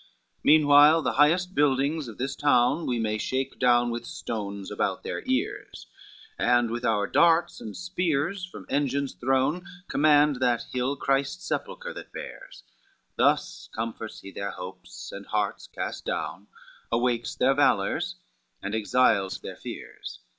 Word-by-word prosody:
LVI - - -29 0.4
"Meanwhile 150 +1 +7
the - - +1
highest 175 +6 +3
buildings 145 0 +1
of 115 - -9
this 135 +2 -3
town 145 +2 +2
We 125 - 0
may 110 -1 -1
shake 130 +4 -2
down 120 -1 +4
with 120 0 -5
stones 100 -3 -5
about - - -1
their - - -4
ears, - - -2 0.5
And 120 -1 +3
with 120 +1 -3
our 105 -2 +2
darts 170 +5 +3
and 105 - -7
spears 180 0 -1
from 180 - -8
engines 140 -1 0
thrown, 135 +7 +1 0.3
Command 150 -1 +4
that 120 -2 +1
hill 125 +2 0
Christ's 135 0 -1
sepulchre - - -4
that - - -10
bears:" - - -9 0.5
Thus - - +1
comforts 110 -1 -5
he 95 - -10
their 100 +1 -4
hopes 90 0 -9
and 100 0 -9
hearts 105 -1 -2
cast - - -5
down, 100 +3 -4 0.4
Awakes 120 0 0
their 130 +2 +3
valors, 110 -8 +1 0.4
and 100 +2 -5
exiles 110 -3 +2
their - - -7
fears. - - -8
130 Hz, 145 wpm, -26 LUFS, 115-145 Hz, 0.5 s, Meanwhile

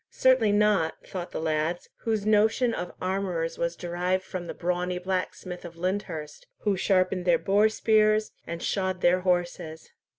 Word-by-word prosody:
"Certainly 255 -5 +3
not," 205 -6 +3
thought 180 -2 -5
the - - -5
lads, 160 +2 -1 0.2
whose 220 -3 0
notion 220 +3 +3
of 180 - -4
armourers 185 -3 -2
was 170 0 -1
derived 180 +2 -1
from 180 -2 -6
the - - -4
brawny 180 +1 -1
blacksmith 180 0 -3
of 170 -1 -10
Lyndhurst, 175 -4 -4
who 205 -2 +1
sharpened 185 -1 +1
their 175 -2 +5
boar 205 +5 +3
spears 215 -1 +3 0.2
and 170 0 -5
shod 185 -2 -1
their 180 +1 +4
horses. 175 -3 -2
185 Hz, 155 wpm, -27 LUFS, 175-205 Hz, 0.2 s, their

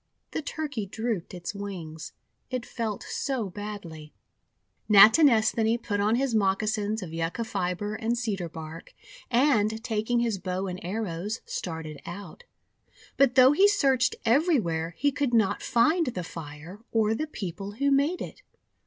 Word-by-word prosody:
The - - -2
Turkey 290 -8 -4
drooped 220 -3 -3
its 175 +2 -6
wings, 180 -6 -7 0.4
it 255 -2 -3
felt 220 -4 -4
so 245 -9 -3
badly. 175 -7 -8 0.7
Natinesthani 220 0 +6
put 215 -4 -3
on 210 +3 +2
his 265 0 0
moccasins 210 +1 0
of 165 -3 -8
Yucca 165 +6 -2
fibre 195 0 -2
and 225 +2 -1
Cedar 200 -8 -2
bark, 160 +1 -9 0.3
and, 225 -4 +2
taking 230 0 0
his 230 -4 0
bow 185 +1 -3
and 185 -1 -5
arrows, 200 +1 -3
started 160 -4 -5
out. 205 - -9 0.7
But 275 -3 +3
though 260 0 +8
he 385 +7 +5
searched 270 -11 +2
everywhere, 225 - +2
he 285 +2 +2
could 280 -3 0
riot 200 -2 0
find 310 +8 +2
the 185 -8 -3
fire 160 +3 -9
or 220 -1 +2
the 310 +7 -2
people 200 - -6
who 280 +6 +1
made 285 +6 +2
it. - - -10
215 Hz, 145 wpm, -27 LUFS, 185-250 Hz, 0.7 s, though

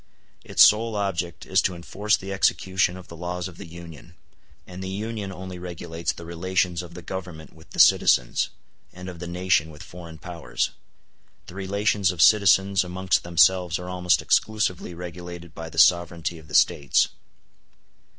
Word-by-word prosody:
Its - - +5
sole 110 +1 +4
object 90 -4 -3
is 95 0 +2
to 90 - -1
enforce 100 +5 0
the 95 +1 -6
execution 95 -1 +1
of 90 - -12
the 85 - -11
laws 90 +1 -4
of 90 -2 -13
the - - -9
Union; 85 -2 -12 0.5
and 95 +1 -9
the 95 - -5
Union 105 0 -4
only 95 -1 -8
regulates 85 -1 -4
the 85 - -11
relations 85 +1 -1
of 85 -1 -11
the 90 - -9
Government 90 -4 -7
with 80 0 -18
the - - -12
citizens, - - +4 0.4
and 90 +1 -10
of 90 -2 -8
the 90 - -6
nation 85 -3 +1
with 75 -1 -12
Foreign 85 -2 -11
Powers: 85 0 -3 0.7
the - - -12
relations 100 0 0
of 90 -2 -4
citizens 95 +3 +5
amongst 95 +1 0
themselves 85 +1 +3
are 90 0 -7
almost 90 -1 +1
exclusively 100 -5 0
regulated 85 -1 -9
by 80 0 -7
the 80 - -13
sovereignty 85 0 +3
of 75 - -16
the 75 - -5
States. 70 -1 +3
90 Hz, 165 wpm, -24 LUFS, 85-95 Hz, 0.7 s, Its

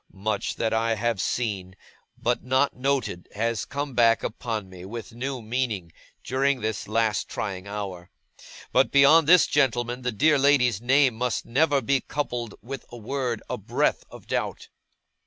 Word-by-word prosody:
Much 110 -2 -1
that 115 -1 -1
I 115 0 +1
have 115 -2 -1
seen, 100 -6 -2 0.4
but 120 +1 -1
not 130 +2 +1
noted, 125 -9 -1
has 115 0 -1
come 140 -1 -4
back 115 -1 +4
upon 110 -3 -3
me 90 -1 -11
with 115 +4 -8
new 130 +1 -4
meaning, 110 -7 -2 0.3
during 135 +1 +1
this 110 -1 -3
last 110 0 0
trying 95 -2 -4
hour. 95 -4 -6 0.6
But, - - +4
beyond 145 +3 +6
this, 180 0 +7
gentlemen, 125 -3 +1
the 125 0 -1
dear 145 +6 +3
lady's 125 -6 +3
name 130 -1 +3 0.2
never 145 +5 +2
must 135 -4 +1
be 135 0 +2
coupled 120 -6 -4
with 135 +3 -6
a 120 - -9
word, 120 0 -3
a - - -4
breath, - - 0
of - - -13
doubt. - - -3
120 Hz, 155 wpm, -25 LUFS, 110-135 Hz, 0.6 s, this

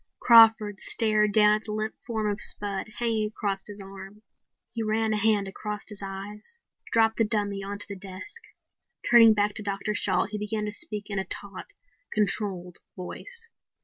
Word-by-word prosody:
Crawford 225 -4 +6
stared 215 -2 +1
down 210 0 +5
at 215 - -13
the 210 - -5
limp 215 0 -3
form 220 -3 -2
of 205 0 0
Spud 200 -1 +4
hanging 225 -3 0
across 200 -2 -4
his 205 0 -8
arm. 195 +2 -11 0.5
He 230 - -5
ran 220 0 0
a - - 0
hand 210 -2 +2
across 210 +1 -6
his 210 -2 -3
eyes, 200 - -8 0.3
dropped 225 -1 +2
the 225 - +3
dummy 205 -2 0
onto 200 +1 -3
the 200 - -6
desk. 190 - -7 0.7
Turning 230 -2 +7
back 205 0 +1
to 220 - -6
Dr. 200 +1 -3
Shalt, 190 -1 0
he 210 - -4
began 210 0 -3
to 210 - -3
speak 210 0 -4
in 200 - -1
a - - -1
taut, 195 +1 -9 0.4
controlled 195 -4 0 0.2
voice. 460 - -7
210 Hz, 175 wpm, -26 LUFS, 200-220 Hz, 0.7 s, Turning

